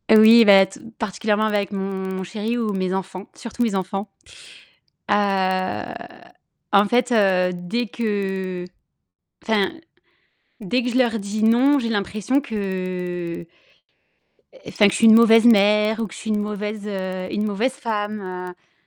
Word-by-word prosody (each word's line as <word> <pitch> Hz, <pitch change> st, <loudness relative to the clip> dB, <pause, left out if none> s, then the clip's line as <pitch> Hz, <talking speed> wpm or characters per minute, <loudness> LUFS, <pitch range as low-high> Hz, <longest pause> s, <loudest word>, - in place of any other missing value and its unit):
Oui 225 Hz, +2 st, +8 dB
bah, 195 Hz, -2 st, +7 dB
tout 190 Hz, -, -14 dB, 0.2 s
particulièrement 215 Hz, 0 st, -1 dB
avec 205 Hz, -1 st, -1 dB
mon 190 Hz, -1 st, -4 dB
chéri 220 Hz, +5 st, -4 dB
ou 220 Hz, -3 st, -1 dB
mes 185 Hz, -2 st, -2 dB
enfants, 190 Hz, 0 st, -5 dB
surtout 235 Hz, +1 st, -8 dB
mes 225 Hz, -4 st, -1 dB
enfants. 195 Hz, +2 st, -3 dB, 1.0 s
Heu, 190 Hz, -2 st, 0 dB, 0.8 s
en 200 Hz, +1 st, +5 dB
fait 245 Hz, +3 st, +1 dB
heu, 190 Hz, -5 st, +2 dB
dès 180 Hz, +7 st, -3 dB
que 190 Hz, -5 st, -3 dB, 0.8 s
enfin, 210 Hz, -3 st, 0 dB, 0.9 s
dès 235 Hz, +5 st, -1 dB
que 250 Hz, -, -2 dB
je 250 Hz, -, 0 dB
leur 235 Hz, -3 st, +1 dB
dis 205 Hz, +1 st, -4 dB
«non», 255 Hz, +6 st, +4 dB
j'ai 235 Hz, -4 st, -2 dB
l'impression 215 Hz, +5 st, -1 dB
que 185 Hz, -6 st, -5 dB, 1.2 s
enfin 205 Hz, -, +3 dB
que 200 Hz, -, 0 dB
je -, -, -1 dB
suis 230 Hz, -, +5 dB
une 220 Hz, -, +8 dB
mauvaise 230 Hz, 0 st, +6 dB
mère 210 Hz, 0 st, +4 dB
ou 225 Hz, -, -2 dB
que 185 Hz, -, -14 dB
je -, -, -10 dB
suis 220 Hz, -, -7 dB
une 210 Hz, -1 st, 0 dB
mauvaise, 210 Hz, 0 st, -5 dB
heu, 185 Hz, -2 st, -4 dB
une 210 Hz, -, -2 dB
mauvaise 215 Hz, +5 st, -1 dB
femme, 215 Hz, -5 st, -4 dB
heu, 180 Hz, -1 st, -9 dB
205 Hz, 150 wpm, -21 LUFS, 190-225 Hz, 1.2 s, Oui